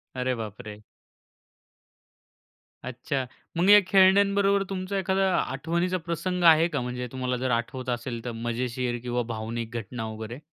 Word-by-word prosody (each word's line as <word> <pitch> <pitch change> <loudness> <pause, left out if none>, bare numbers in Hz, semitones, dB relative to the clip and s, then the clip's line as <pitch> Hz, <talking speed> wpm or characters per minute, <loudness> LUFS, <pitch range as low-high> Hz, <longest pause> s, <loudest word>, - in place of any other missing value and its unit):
अरे, 125 0 -1
बापरे! 105 -1 -8 2.0
अच्छा, 130 +2 -3 0.3
मग 180 +3 +3
या 205 0 +10
खेळण्यांबरोबर 200 +1 +4
तुमचा 190 +1 -3
एखादा 190 0 +1
आठवणीचा 170 +7 -1
प्रसंग 175 +1 -2
आहे 165 0 +7
का? 145 -6 -2
म्हणजे 125 0 -4
तुम्हाला 125 -1 -2
जर 130 0 -1
आठवत 120 +2 -2
असेल 120 -1 -3
तर 120 - -3
मजेशीर 120 +1 -2
किंवा 125 0 -1
भावनिक 115 +1 -5
घटना 115 +1 -5
वगैरे? 110 +3 -7
130 Hz, 130 wpm, -26 LUFS, 120-180 Hz, 2.0 s, या